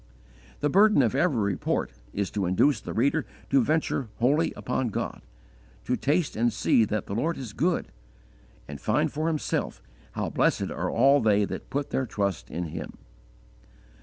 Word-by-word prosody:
The 145 Hz, -, +2 dB
burden 205 Hz, -6 st, +5 dB
of 115 Hz, -, +1 dB
every 140 Hz, -2 st, +2 dB
report 100 Hz, -3 st, -1 dB, 0.2 s
is 100 Hz, -1 st, -2 dB
to 100 Hz, -4 st, -1 dB
induce 110 Hz, +7 st, +3 dB
the -, -, -6 dB
reader 140 Hz, +6 st, +1 dB, 0.3 s
to 135 Hz, -2 st, +5 dB
venture 150 Hz, -3 st, 0 dB
wholly 145 Hz, +7 st, +2 dB
upon 125 Hz, 0 st, -2 dB
God, -, -, -4 dB, 0.6 s
to 125 Hz, -, +1 dB
taste 145 Hz, +5 st, 0 dB
and 120 Hz, +2 st, +2 dB
see 110 Hz, -, +3 dB
that 105 Hz, -1 st, -2 dB
the -, -, -6 dB
Lord 155 Hz, +10 st, -1 dB
is 125 Hz, -6 st, -7 dB
good, 170 Hz, +8 st, 0 dB, 0.8 s
and 70 Hz, -2 st, -8 dB
find -, -, +1 dB
for 155 Hz, +3 st, -1 dB
himself 160 Hz, -2 st, -2 dB, 0.3 s
how -, -, -2 dB
blessed -, -, +1 dB
are -, -, -2 dB
all 135 Hz, +4 st, +4 dB
they 105 Hz, -2 st, +3 dB
that -, -, -7 dB
put 140 Hz, 0 st, -3 dB
their 130 Hz, -, 0 dB
trust 100 Hz, -, -2 dB
in 85 Hz, -1 st, -4 dB
Him. -, -, -7 dB
125 Hz, 165 wpm, -27 LUFS, 105-145 Hz, 0.8 s, burden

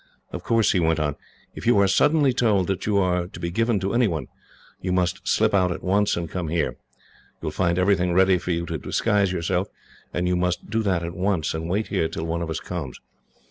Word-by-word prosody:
"Of -, -, -5 dB
course," 115 Hz, -2 st, +3 dB
he 95 Hz, -, +2 dB
went 80 Hz, -1 st, +2 dB
on, 75 Hz, -2 st, -1 dB, 0.4 s
"if -, -, -7 dB
you 120 Hz, -, +5 dB
are 100 Hz, 0 st, +5 dB
suddenly 145 Hz, +6 st, +3 dB
told 105 Hz, -7 st, +2 dB
that 95 Hz, +2 st, -3 dB
you 105 Hz, -2 st, +2 dB
are 90 Hz, -2 st, +1 dB
to -, -, -11 dB
be 85 Hz, -, -3 dB
given 115 Hz, +2 st, +1 dB
to 95 Hz, +2 st, -1 dB
any 120 Hz, -1 st, +3 dB
one, 80 Hz, -8 st, -3 dB, 0.6 s
you 90 Hz, -, -2 dB
must 90 Hz, -1 st, -1 dB
slip -, -, +2 dB
out 90 Hz, -2 st, +3 dB
at -, -, -5 dB
once, 100 Hz, +1 st, +2 dB
and 85 Hz, -1 st, -3 dB
come 85 Hz, +1 st, -4 dB
here. 85 Hz, +1 st, 0 dB
You -, -, -17 dB, 0.7 s
will -, -, -2 dB
find 85 Hz, -2 st, 0 dB
everything 90 Hz, -1 st, +2 dB
ready 95 Hz, +1 st, +4 dB
for 90 Hz, -, -7 dB
you 85 Hz, -1 st, 0 dB
to 80 Hz, -2 st, -4 dB
disguise 100 Hz, -, +1 dB
yourself, 90 Hz, +2 st, -1 dB, 0.4 s
and 90 Hz, 0 st, -1 dB
you 90 Hz, -, +1 dB
must 90 Hz, +2 st, -1 dB
do 115 Hz, 0 st, +1 dB
that 95 Hz, -5 st, 0 dB
at 85 Hz, 0 st, -4 dB
once, 90 Hz, -3 st, 0 dB
and 80 Hz, +1 st, -4 dB
wait 105 Hz, +4 st, -1 dB
here 80 Hz, -, +1 dB
till 80 Hz, -, -4 dB
one 85 Hz, +1 st, -2 dB
of 85 Hz, -, -3 dB
us 80 Hz, -, -2 dB
comes. 80 Hz, -8 st, -6 dB
90 Hz, 235 wpm, -24 LUFS, 85-100 Hz, 0.7 s, you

